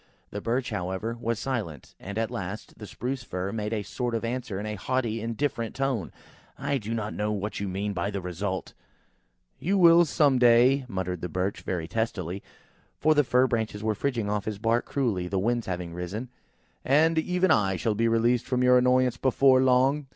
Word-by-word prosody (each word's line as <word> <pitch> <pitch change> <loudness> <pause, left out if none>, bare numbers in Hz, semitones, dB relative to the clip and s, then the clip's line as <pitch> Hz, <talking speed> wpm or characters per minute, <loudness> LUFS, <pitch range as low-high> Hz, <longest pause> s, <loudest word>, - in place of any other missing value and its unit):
The 105 - -5
Birch, 120 +3 -1
however, 95 +6 -3
was 115 -1 -1
silent, 105 - -4
and 100 +2 -7
at 115 0 -1
last, 95 +5 -6
the 105 - -8
Spruce 130 +4 -4
fir 95 -4 -4
made 105 -1 -3
a 110 -2 -1
sort 120 +2 -3
of 115 - -2
answer 120 -4 -3
in 105 - -5
a 105 - -3
haughty, 115 +2 -2
indifferent 115 0 -2
tone–"I 135 - -4
do 115 +1 -4
not 110 -1 -3
know 105 0 -1
what 105 0 -3
you 100 - -2
mean 100 +2 -2
by 95 +1 -2
the 100 -1 -3
result." 95 +1 -4 0.9
"You 195 +4 +1
will 170 -2 +7
know - - +7
some 145 -4 +3
day," 125 +3 +5
muttered 90 -5 -3
the 90 - -4
Birch, 95 +4 -2
very 85 -4 -3
testily, 95 -4 -3 0.6
(for 155 +1 +3
the 150 -1 +4
fir 125 0 +3
branches 110 -4 -2
were 110 0 +1
fridging 115 -1 -2 0.2
his 105 0 -4
bark 115 +3 +1
cruelly–the 100 -9 -1
wind 120 +4 0
having 90 -2 -4
risen–) 95 +8 -5 0.5
"and 160 +4 +3
even 180 +3 +1
I 95 -2 +3
shall 110 +4 0
be 115 +2 +1
released 115 +1 +2
from 125 -1 +1
your 125 0 +6
annoyance, 125 -1 +3
before 130 0 +4
long!" 130 +3 +3
115 Hz, 190 wpm, -27 LUFS, 100-130 Hz, 0.9 s, will